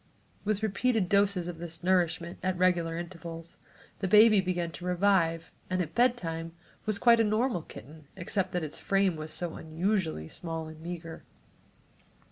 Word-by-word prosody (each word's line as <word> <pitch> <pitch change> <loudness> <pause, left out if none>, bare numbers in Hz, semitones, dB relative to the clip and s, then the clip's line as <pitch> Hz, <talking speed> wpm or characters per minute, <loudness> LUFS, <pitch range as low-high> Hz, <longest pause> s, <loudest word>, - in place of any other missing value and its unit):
With 215 0 0
repeated 220 -1 +1
doses 200 -3 +2
of 175 -2 -6
this 170 0 -7
nourishment 175 -2 +1
at 185 -1 -1
regular 175 -2 +2
intervals 170 -1 -8 0.4
the 190 - -1
baby 210 +1 +7
began 175 -2 -2
to 175 - -10
revive 180 -3 +2 0.2
and 185 0 0
at 165 -3 -2
bedtime 165 -10 0 0.3
was 215 -2 +1
quite 235 +1 +5
a - - +5
normal 220 -2 +1
kitten, 150 +2 -12
except 185 0 -2
that 180 -2 -1
its 150 - -5
frame 195 -3 +2
was 155 0 -6
so 170 0 -2
unusually 160 - -1
small 165 - -5
and 155 0 -11
meager. 165 -1 -7
175 Hz, 155 wpm, -29 LUFS, 165-200 Hz, 0.4 s, baby